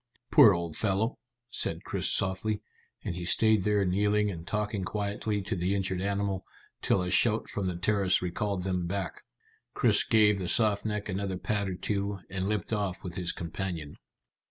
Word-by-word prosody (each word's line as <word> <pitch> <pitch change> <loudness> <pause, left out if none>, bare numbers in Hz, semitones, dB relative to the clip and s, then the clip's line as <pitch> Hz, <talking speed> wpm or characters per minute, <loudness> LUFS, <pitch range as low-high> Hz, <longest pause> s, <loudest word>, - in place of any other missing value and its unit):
"Poor - - +9
old 85 -2 -2
fellow," 110 +4 0 0.3
said - - -1
Chris - - -1
softly, 95 +3 0 0.4
and - - -3
he 90 0 -5
stayed 110 +4 +4
there 105 0 +2
kneeling 105 +3 +2
and 85 -1 -8
talking 105 -1 -1
quietly 105 +1 -2
to 110 - -2
the 90 +2 0
injured 95 -2 -1
animal, 100 -1 -1 0.4
till 90 - +2
a 90 - -3
shout 110 +2 +3
from 100 -2 -3
the 90 - -2
terrace 95 +1 +2
recalled 90 +1 -2
them 90 -2 -1
back. 95 -2 -3 0.5
Chris - - +4
gave 105 -2 +4
the 90 - -3
soft 105 -1 +2
neck 105 -1 -2
another 95 -1 -2
pat 100 +1 -1
or 90 - -3
two, 100 +2 -2
and 95 +1 -2
limped 105 0 -2
off 100 -4 -2
with 90 - -6
his 90 -1 -1
companion. 85 -3 -5
100 Hz, 175 wpm, -29 LUFS, 90-105 Hz, 0.5 s, Poor